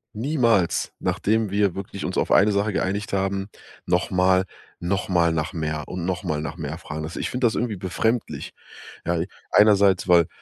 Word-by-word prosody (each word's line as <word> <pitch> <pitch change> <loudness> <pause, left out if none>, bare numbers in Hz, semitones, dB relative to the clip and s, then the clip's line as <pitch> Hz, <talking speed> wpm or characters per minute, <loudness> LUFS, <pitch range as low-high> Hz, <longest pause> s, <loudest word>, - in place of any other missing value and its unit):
niemals, 115 - +1
nachdem 110 0 0
wir 100 -3 +1
wirklich 100 0 -6
uns 90 - -3
auf - - 0
eine 105 +2 +5
Sache 100 +1 0
geeinigt 100 +3 -2
haben, 95 0 -1 0.4
noch 90 +1 +1
mal 95 0 +3 0.3
noch 90 +2 -1
mal 85 -3 +3
nach 80 -2 -2
mehr 75 -2 -3
und 90 -2 -5
noch 90 0 -2
mal 75 -3 -1
nach 80 +1 -5
mehr 75 -1 -5
fragen. 80 -2 -6
Also, 80 - -7
ich - - -2
find 125 +1 -4
das 115 - +2
irgendwie 115 -4 -1
befremdlich, 110 +6 -2 0.5
ja? 85 -1 0 0.3
Einerseits, 100 -3 +5
weil 85 -2 +6
95 Hz, 180 wpm, -24 LUFS, 85-105 Hz, 0.5 s, weil